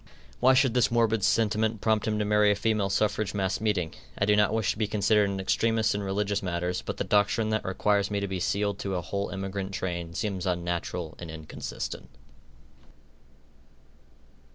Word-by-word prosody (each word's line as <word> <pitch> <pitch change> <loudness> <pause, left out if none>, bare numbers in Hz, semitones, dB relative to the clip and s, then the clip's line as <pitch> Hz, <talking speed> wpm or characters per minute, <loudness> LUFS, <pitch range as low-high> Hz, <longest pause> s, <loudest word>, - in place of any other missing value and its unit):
Why 130 +1 +5
should 130 -2 +3
this 125 -1 +3
morbid 115 -3 +2
sentiment 110 0 +2
prompt 110 0 +1
him 105 -1 0
to 105 - 0
marry 105 0 +4
a 105 - +3
Female 105 -1 0
Suffrage 105 0 0
Mass 95 0 -1
Meeting? 95 -7 0 0.2
I 100 - +2
do 105 0 +4
not 105 0 +3
wish 110 -2 +1
to - - -6
be 110 - +1
considered 105 0 +2
an 100 -1 -3
extremist 110 +3 +1
in 105 - -2
religious 100 +1 -1
matters, 90 0 -2
but - - -5
the - - -1
doctrine 105 +2 +2
that 110 - 0
requires 100 +1 +1
me 100 -1 -1
to 100 - -2
be 95 -1 -3
sealed 100 +2 -1
to 95 -1 -3
a 90 - -1
whole 100 +2 -3
emigrant 95 0 -4
train, 85 -2 -4
seems 100 -3 -2
unnatural 85 -2 -2
and 85 - -7
inconsistent. 80 -1 -6
100 Hz, 180 wpm, -27 LUFS, 95-110 Hz, 0.2 s, Why